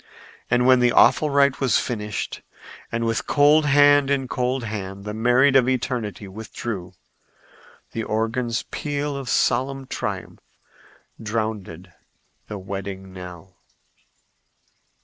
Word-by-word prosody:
And 125 0 +3
when 130 0 +6
the 125 0 +3
awful 150 +4 +5
rite 140 -1 +3
was 130 -5 +3
finished 105 -4 -4 0.5
and 115 0 -1
with 115 -1 -1
cold 150 +1 +4
hand 145 0 +5
in 135 -2 0
cold 125 +1 -1
hand 100 -3 -6
the 105 - -4
married 125 +5 +3
of 130 -1 +5
eternity 120 -5 -2
withdrew, 100 -2 -6 1.0
the 115 - -3
organ's 115 +2 -1
peal 145 -1 -3
of 135 -3 -5
solemn 135 +3 +1
triumph - - -5 0.8
drowned 105 -6 -4 0.6
the 105 - -6
wedding 95 0 -7
knell. 90 0 -11
115 Hz, 115 wpm, -23 LUFS, 105-135 Hz, 1.0 s, when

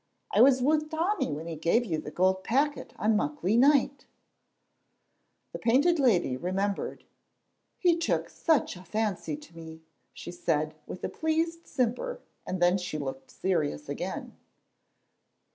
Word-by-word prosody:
I - - +4
was 260 -1 +6
wi' 305 +3 +4
Tommy 320 - -1
when 150 +3 -5
he 165 -1 -5
gave 170 +10 +2
you 160 -7 -1
the 155 - -7
gold 190 +3 +1
packet 285 +5 0
on 215 +1 +2
Muckley 175 +3 0
night." 280 +2 +4
Then - - -26 1.4
the - - -6
Painted 285 +9 +3
Lady 190 - +3
remembered. 195 +7 -2 0.7
"He 350 -2 +3
took 335 - 0
such 315 - +1
a 180 - -11
fancy 190 -6 -2
to 160 +2 -16
me," 160 -1 -10 0.3
she 175 - -8
said, 155 -3 -1
with 185 - -8
a - - -1
pleased 325 +1 -1
simper, 265 - -1 0.3
and 185 - -2
then 175 +2 +4
she 180 -4 -4
looked 135 -2 -6
serious 155 - -1
again. - - -5
200 Hz, 145 wpm, -28 LUFS, -, 1.4 s, was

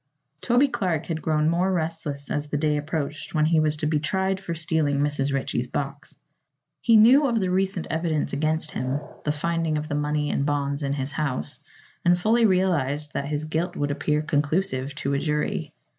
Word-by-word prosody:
Toby 250 +3 +4
Clark 185 - -1
had 160 -2 -3
grown 155 -1 +1
more 175 +3 +2
restless 160 -5 -3
as 145 0 -1
the 150 - -2
day 150 0 +1
approached 150 0 -4
when 155 0 +3
he 160 0 +3
was 155 -1 +1
to 155 - -2
be 150 0 +1
tried 190 +5 0
for 175 -3 -4
stealing 155 -3 0
Mrs. 145 -1 +1
Ritchie's 130 -2 -1
box. 140 +2 -5 0.6
He 230 -2 +5
knew 260 +7 +7
of 235 -3 +1
the 185 -3 0
recent 190 -1 0
evidence 160 -1 -1
against 155 +2 0
him 130 +3 -2 0.3
the 150 - +2
finding 165 +1 -1
of 150 0 -3
the - - -2
money 150 0 0
and - - 0
bonds 140 0 -1
in 140 -1 -1
his 135 0 -3
house 140 - -2 0.4
and 175 0 +4
fully 225 +5 +3
realized 155 -6 +1
that 140 - -2
his 150 +1 -2
guilt 165 +3 -2
would 145 0 -1
appear 150 +1 0
conclusive 145 -2 0
to 140 0 -2
a 140 - +1
jury. 150 +1 -1
155 Hz, 190 wpm, -25 LUFS, 145-170 Hz, 0.6 s, knew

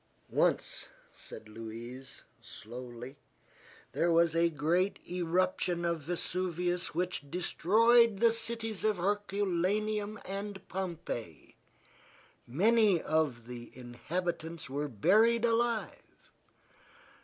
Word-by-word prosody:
"Once," - - 0 0.2
said 110 - -11
Louise, 115 +4 -9 0.2
slowly, 120 +3 -9 0.7
"there 170 +1 +1
was 165 -1 +4
a 170 0 +4
great 165 +5 +1
eruption 180 0 0
of 170 -1 0
Vesuvius 175 +2 -2
which 175 -5 -2
destroyed 220 +7 +4
the 230 +2 +4
cities 225 -2 -3
of 215 -2 +2
Herculaneum 205 +2 0
and 195 0 -6
Pompeii. 170 - -5 0.9
Many 205 - +4
of 150 -8 0
the 120 -1 -8
inhabitants 160 +6 -4
were 145 +3 -2
buried 215 - +4
alive. 230 -1 -1
175 Hz, 90 wpm, -31 LUFS, 150-205 Hz, 0.9 s, was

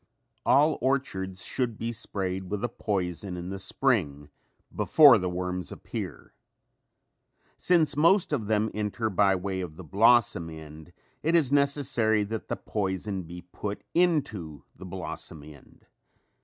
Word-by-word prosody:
All 150 +4 +4
orchards 95 -9 -1
should 120 -4 -2
be 115 +1 -3
sprayed 95 -4 -4
with 105 +2 -3
a 120 - 0
poison 95 -4 -3
in 90 +1 -6
the 95 - -5
spring 90 - 0 0.5
before 145 -8 +7
the 90 -1 -2
worms 90 0 -4
appear. - - -7 1.2
Since 170 -4 +2
most 170 +3 +3
of 115 -8 -1
them 110 0 +1
enter 105 +1 -2
by 95 0 +3
way 95 0 -3
of 85 -4 -6
the 95 - -10
blossom 100 -1 +3
end, 80 +1 -11 0.3
it 165 +3 +1
is 150 -6 +3
necessary 140 -7 +2
that 110 +2 -5
the - - -2
poison 95 -1 -3
be 90 +1 -9
put 100 +3 -6
into 130 - 0
the 95 - -11
blossom 85 -4 -7
end. 75 -2 -16
100 Hz, 140 wpm, -27 LUFS, 90-125 Hz, 1.2 s, before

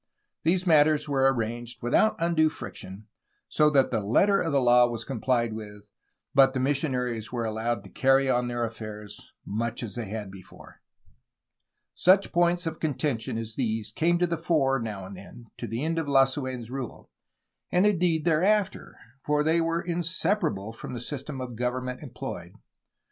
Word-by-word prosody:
These 180 +3 +1
matters 155 -2 +4
were 135 -2 +3
arranged 120 0 -4
without 170 - +3
undue 165 -2 +2
friction, 100 -9 -8 0.4
so 150 -1 +3
that 140 -3 +3
the 115 - +1
letter 190 - +3
of 165 - -1
the 140 - +3
law 120 -1 +5
was 115 -2 -5
comphed 120 -2 0
with, 105 -1 -10 0.4
but 135 -1 +5
the - - 0
missionaries 125 -5 -1
were 120 -2 -2
allowed 110 0 -2
to - - -12
carry 135 0 +3
on 125 -1 +1
their 120 -1 -2
affairs 105 -2 -8
much 115 +3 -3
as 110 - -6
they 120 -2 -4
had 105 -2 -5
before. 95 -2 -14 1.1
Such 190 +2 +4
points 175 0 +2
of 160 -1 -4
contention 140 -7 -2
as 115 -1 -4
these 110 -4 -2
came 170 +9 +2
to 175 - +2
the 170 -2 -2
fore 145 -5 +2
now 105 -4 -5
and 95 +1 -9
then 110 +5 -13
to 120 - -4
the 115 +5 -3
end 165 +1 0
of 160 - -3
Lasu6n*s 130 -3 +1
rule, 130 -3 -7 0.6
and 180 +3 +3
indeed, 175 -6 +2
thereafter, 185 +5 +1 0.3
for 150 0 +1
they 160 +2 +2
were 165 +1 -1
inseparable 170 - -1
from 115 - -7
the - - -4
system 140 +2 -6
of 125 -2 -6
government 125 +1 -3
employed. 120 - -7
130 Hz, 165 wpm, -27 LUFS, 115-160 Hz, 1.1 s, law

